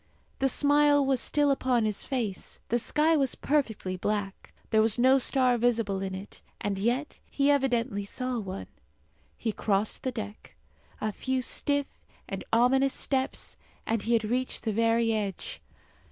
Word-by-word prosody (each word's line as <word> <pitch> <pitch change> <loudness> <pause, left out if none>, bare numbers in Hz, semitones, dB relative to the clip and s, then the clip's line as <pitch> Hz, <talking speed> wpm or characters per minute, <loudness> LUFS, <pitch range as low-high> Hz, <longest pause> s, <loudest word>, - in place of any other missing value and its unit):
The 270 - +2
smile 290 +1 +4
was 265 -2 +2
still 290 -1 +2
upon 255 -4 +1
his 210 -2 0
face. 235 -8 -4
The 240 - +2
sky 310 +6 +2
was 275 -4 +1
perfectly 225 -10 -1
black; 205 0 -3 0.2
there 220 -1 +5
was 220 +1 +2
no 260 +2 +5
star 255 -2 +2
visible 225 -5 +1
in 190 -1 -3
it, 195 +2 -10 0.2
and 200 -2 -2
yet 245 +8 -1
he 280 0 +2
evidently 245 -6 +1
saw 255 +4 -3
one. 185 - -6 0.7
He 225 - -1
crossed 205 0 -1
the 260 - -2
deck. 215 -3 -8 0.4
A 215 - -1
few 260 +5 -2
stiff 285 +3 +1 0.4
and - - -5
ominous 260 +4 +3
steps, 265 -1 -2 0.3
and 225 -1 0
he 230 +3 0
had 225 -1 +3
reached 250 +4 -1
the 220 - -1
very 230 +1 +2
edge. 205 -3 -4
240 Hz, 155 wpm, -28 LUFS, 210-270 Hz, 0.7 s, there